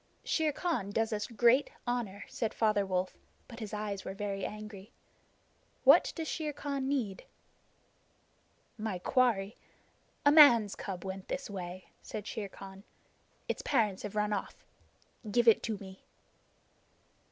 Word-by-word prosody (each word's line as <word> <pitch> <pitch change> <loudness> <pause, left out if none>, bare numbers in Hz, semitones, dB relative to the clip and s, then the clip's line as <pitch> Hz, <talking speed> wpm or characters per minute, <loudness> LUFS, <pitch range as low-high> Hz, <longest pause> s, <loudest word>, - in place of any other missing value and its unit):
"Shere 315 -2 +1
Khan 290 - -2
does 225 +2 0
us 210 -1 -2
great 240 +4 +4 0.2
honor," 235 -5 -2
said 225 -3 -3
Father 210 -3 +2
Wolf, 185 0 -2 0.3
but 230 -1 -10
his 215 -3 -6
eyes 210 -2 -4
were 190 - -6
very 200 -1 -3
angry. 210 0 -7 0.9
"What - - +7
does 325 -2 -4
Shere 305 -2 -3
Khan 280 -2 -3
need?" 230 -9 -2 1.5
"My 215 -3 -2
quarry. 220 -1 +1 0.7
A 285 - +7
man's 240 -9 +8
cub 190 -2 -6
went 190 0 -6
this 275 -5 -4
way," 185 -1 -6 0.2
said 210 - -6
Shere 210 -2 -4
Khan. 195 0 -11 0.6
"Its - - -2
parents 215 -8 +1
have 210 0 -6
run 210 0 +1
off. 200 - -5 0.6
Give 235 +3 +2
it 225 - +7
to 215 - -1
me." 190 -1 -12
210 Hz, 140 wpm, -32 LUFS, 195-240 Hz, 1.5 s, man's